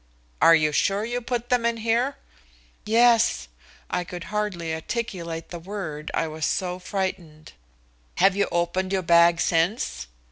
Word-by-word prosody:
"Are 165 - +8
you 155 -1 +2
sure 195 +7 +1
you 240 +1 -3
put 240 0 -3
them 245 -2 +2
in 235 0 +1
here?" 230 +5 0 0.7
"Yes." 230 - +4 0.4
I 180 - -2
could 175 0 -8
hardly 185 -6 -2
articulate 170 -2 -4
the 175 - -7
word, 165 -5 -6
I 165 - 0
was 155 0 -7
so 180 -1 -2
frightened. 180 -5 -5 0.6
"Have 195 - +4
you 200 - +1
opened 180 +2 -1
your 190 -1 0
bag 170 0 +5
since?" 165 - 0
180 Hz, 145 wpm, -24 LUFS, 165-220 Hz, 0.7 s, Are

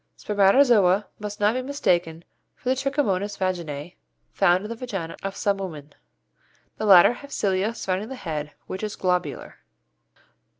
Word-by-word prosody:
Spermatozoa 205 -1 +4
must 210 0 -6
not 210 +1 +3
be 255 - -1
mistaken 175 - -1 0.3
for 255 - -5
the 260 - +3
Trichomonas 215 -8 -1
vaginæ 175 -4 -3 0.4
found 185 0 +2
in - - -6
the - - -4
vaginæ 195 -9 -5
of 195 0 -4
some 200 -1 0
women. 155 -7 -7 0.8
The 215 - -2
latter 190 +3 +8
have 280 +3 -12
cilia 200 +3 0
surrounding 195 +3 -3
the 265 - -6
head, 155 - -5
which 185 - -6
is 215 -1 -4
globular. 180 -1 -2
195 Hz, 145 wpm, -24 LUFS, 180-220 Hz, 0.8 s, latter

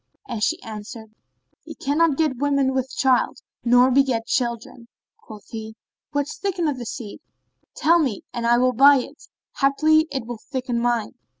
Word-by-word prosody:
And 235 -4 -5
she - - +1
answered, 220 0 -9 0.5
"He - - -10
cannot 290 +1 +1
get 305 -5 0
women 280 -2 +1
with 260 0 -2
child, 260 -2 +2 0.3
nor 245 +2 +5
beget 255 -4 +2
children." 235 0 -3 0.3
Quoth 215 -2 -13
he, 220 -1 -7 0.4
"What 285 -1 -1
thickeneth 340 -7 -2
the 240 - -6
seed? 220 -2 -7 0.6
tell 340 +2 +3
me 260 -11 -1
and 235 -1 -2
I 240 0 +4
will 255 +1 +2
buy 280 +4 +7
it: 255 - -7 0.3
haply, 310 +3 +3
it 265 -4 -3
will 240 -1 -7
thicken 255 -3 -2
mine." 235 -2 -1
255 Hz, 160 wpm, -22 LUFS, 235-280 Hz, 0.6 s, buy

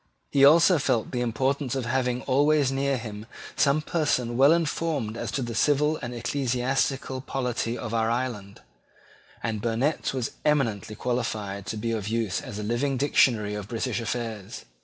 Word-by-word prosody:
He 140 - +4
also 165 +4 +7
felt 125 -5 0
the 125 - -1
importance 130 +3 0
of 130 -3 -2
having 125 0 0
always 145 +1 +3
near 135 0 0
him 110 -2 -7 0.3
some 145 +2 +2
person 130 -8 0
well 135 +4 +6
informed 160 -8 0
as - - -4
to 135 - -1
the 120 -1 -4
civil 150 +4 +2
and 120 - -5
ecclesiastical 130 +2 -1
polity 125 -3 -2
of 115 -2 -5
our 115 -1 +1
island: 115 -5 -3 0.8
and 110 -2 -2
Burnet 120 +7 0
was 130 -3 -2
eminently 115 -8 0
qualified 105 -5 -3
to 110 - -3
be 115 +2 -2
of 110 -3 -2
use 110 -3 -1
as 105 - -7
a 105 - -4
living 125 +5 0
dictionary 120 -6 +3
of 105 -1 -5
British 120 +1 -2
affairs. 115 -4 -5
125 Hz, 160 wpm, -26 LUFS, 115-140 Hz, 0.8 s, also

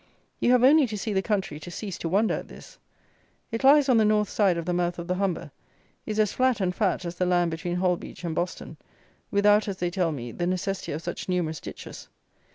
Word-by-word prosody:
You 245 - +3
have 250 -1 +4
only 285 +1 +6
to 215 -2 -5
see 215 +1 -3
the 190 - +2
country 190 -7 -2
to 165 - -9
cease 195 +2 -6
to 165 - -3
wonder 205 +5 +2
at - - -4
this. - - -14 0.7
It 230 +2 -3
lies 285 +1 +6
on 255 -3 +4
the 220 - +5
north 210 0 +2
side 195 -5 +2
of 170 - -4
the 180 - -1
mouth 175 0 0
of 170 - -5
the 180 - 0
Humber; 180 -5 -2 0.6
is 215 -1 -2
as 210 -2 +2
flat 255 -2 +2
and 185 -2 0
fat 185 -2 0
as 170 0 -5
the 180 - +1
land 175 -1 +2
between 175 +2 -3
Holbeach 180 0 -2
and 170 -2 -2
Boston, 175 +3 -4 0.5
without, 205 +1 +4
as 195 -2 -3
they 175 -1 -2
tell 175 -2 0
me, 120 -5 -6
the 175 +6 -3
necessity 185 +1 -2
of 155 +3 -5
such 175 +1 -5
numerous 165 -4 -1
ditches. - - -9
185 Hz, 230 wpm, -26 LUFS, 175-210 Hz, 0.7 s, only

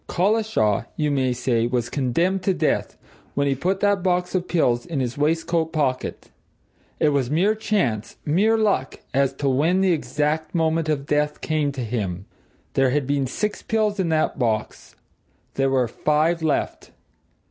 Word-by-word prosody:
Collishaw, 185 - +1
you 150 -2 0
may 130 -2 +1
say, 120 -2 0
was 120 -1 -1
condemned 165 +8 0
to 185 0 +1
death - - -1 0.4
when 140 - +1
he 140 - +2
put 185 +8 -1
that 205 -2 +2
box 180 -1 0
of 180 -1 -1
pills 120 -8 +1
in 165 -5 -4
his 125 -1 -2
waistcoat 165 +2 0
pocket. 140 -5 -2 0.7
It 150 - +4
was 140 -4 0
mere 180 +8 +3
chance, 195 - -1
mere 205 +9 +3
luck, 200 -12 0
as 135 0 +2
to 140 +1 -3
when 155 +8 +2
the 190 -1 +3
exact 150 +2 -1
moment 160 -1 +1
of 140 -2 -1
death 150 0 0
came 155 -2 0
to 130 -2 -4
him. 100 -5 -3 0.5
There 135 -1 +3
had 140 +1 0
been 140 0 0
six 210 - -3
pills 215 -2 0
in 180 -3 +1
that 155 -3 0
box 110 -4 -2 0.6
there 135 0 +1
were 130 -2 +2
five 155 +7 +1
left. 155 -2 -1
150 Hz, 165 wpm, -23 LUFS, 130-180 Hz, 0.7 s, It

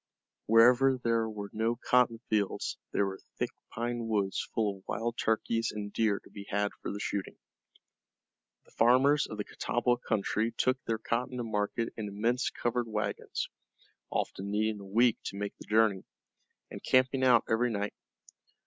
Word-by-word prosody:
Wherever 125 +4 +6
there 115 -2 +1
were 105 -2 -6
no 115 +2 0
cotton 120 -1 +2
fields 105 -3 -1
there 100 - +2
were 95 0 -5 0.2
thick - - -1 0.2
pine 120 0 -3
woods 100 -3 -1
full 105 -3 0
of - - -26
wild 115 +3 -2
turkeys 115 0 0
and 105 -1 -6
deer 105 -3 +2
to - - -16
be 100 -1 -9
had 100 0 0
for - - -4
the 100 - -5
shooting. 100 -2 -3 1.3
The - - -23
farmers 130 +6 +4
of 110 - -7
the 105 - -2
Catawba 120 +3 0
country 110 0 -1
took 130 +1 +1
their 115 - 0
cotton 120 +3 -2
to 120 - -2
market 110 +1 -2
in 110 -2 -3
immense 115 +5 0
covered 120 0 -1
wagons, 105 -2 -3 0.6
often 100 +1 -3
needing 105 +1 0
a 100 - -10
week 115 +4 +3
to 100 - -5
make 100 0 -3
the - - -11
journey, 105 -3 +3 0.7
and - - -8
camping 130 +1 +3
out 125 -3 +6
every 120 +2 +2
night. 105 -2 -2
110 Hz, 165 wpm, -30 LUFS, 105-120 Hz, 1.3 s, Wherever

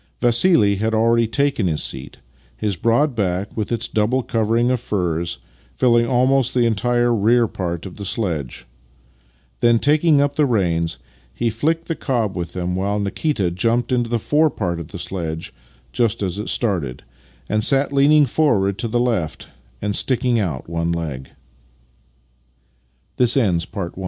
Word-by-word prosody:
Vassili 120 - +3
had 110 +2 0
already 115 +1 +3
taken 140 -3 0
his 80 -3 0
seat, - - -6 0.4
his 100 - -1
broad 120 - +1
back, 95 -3 -2
with 110 0 -3
its 120 - -1
double 115 +5 0
covering 115 +2 +1
of 130 - 0
furs, 85 -6 -2 0.4
filling 120 -2 +3
almost 130 0 +2
the 120 -1 +3
entire 120 +2 +1
rear 115 +2 +3
part 85 -3 -4
of 95 - -9
the 100 - -6
sledge. 85 - -3 0.9
Then, 120 0 +4
taking 150 +3 +3
up 145 0 +1
the 150 -2 +3
reins, 85 - 0 0.3
he 115 - -1
fhcked 160 +9 -1
the 165 - -3
cob 120 -10 -2
with 85 -2 -5
them, 90 0 -3
while 100 +2 -1
Nikita 100 - -1
jumped 115 +8 0
into 120 -2 0
the 120 - +1
forepart 115 - 0
of 85 - -7
the 95 - -8
sledge 85 -3 -5 0.4
just 115 - 0
as 95 +1 -3
it 105 - -4
started, 85 - -1 0.4
and 110 0 0
sat 140 +3 +2
leaning 145 +2 +5
forward 100 -11 +1
to 115 - -1
the 120 +2 -1
115 Hz, 135 wpm, -20 LUFS, 95-125 Hz, 0.9 s, leaning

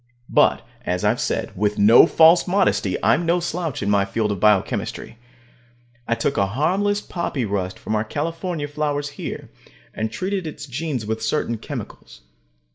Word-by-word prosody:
But, - - +3 0.2
as 90 0 -2
I've - - +2
said, - - -2
with 105 +2 0
no 110 +9 +7
false 165 +3 +5
modesty, 180 - +1
I'm 175 - +3
no 170 +1 +2
slouch 165 - -3
in 100 - -1
my 100 -1 +3
field 105 +2 -1
of 100 - -3
biochemistry. 105 +2 0 0.9
I 115 - +1
took 115 - -1
a 100 - +2
harmless 190 - 0
poppy 165 - -3
rust 95 -3 -3
from - - -5
our 105 0 +1
California 165 - -3
flowers 145 0 -2
here, - - -7 0.4
and 110 0 -3
treated 190 - -3
its 155 - -7
genes 135 -3 -4
with 110 +1 -3
certain 115 -1 -1
chemicals. - - -8
130 Hz, 160 wpm, -22 LUFS, 105-165 Hz, 0.9 s, no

